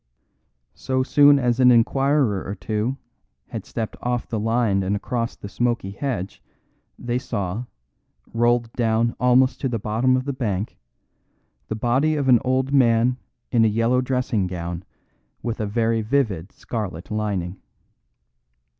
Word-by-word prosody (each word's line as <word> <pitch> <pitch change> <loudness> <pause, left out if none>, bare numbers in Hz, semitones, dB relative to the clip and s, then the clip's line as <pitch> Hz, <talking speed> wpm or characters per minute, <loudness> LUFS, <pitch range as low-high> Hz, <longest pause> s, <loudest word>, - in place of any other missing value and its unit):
So 130 0 -1
soon 145 +1 +6
as 125 -2 +1
an 125 -1 +7
inquirer 125 -2 +3
or 100 - -5
two 110 +5 -2 0.5
had - - -6
stepped 110 -2 -4
off 125 -1 -2
the 110 - -2
line 110 -2 +1
and 95 +2 0
across 115 +3 -3
the - - -9
smoky 120 -2 -1
hedge, 100 -4 -4 0.6
they 120 0 -2
saw, 110 -3 -3 0.7
rolled 120 0 +1
down 115 0 +1
almost 125 +1 +3
to 135 - 0
the 120 - -1
bottom 115 +5 +1
of 130 - -3
the 140 - -2
bank, 105 -6 -3 0.9
the 110 - -3
body 130 +8 +1
of 140 -3 -1
an 120 -2 +7
old 130 +1 0
man 125 -1 +4 0.3
in 115 -2 +4
a - - +5
yellow 115 +4 +2
dressing 125 -6 0
gown 85 -1 -5 0.6
with 115 -1 -3
a 105 - -1
very 115 +1 +1
vivid 110 -8 -1
scarlet 95 -7 -6
lining. 100 -4 -2
115 Hz, 145 wpm, -23 LUFS, 105-130 Hz, 0.9 s, an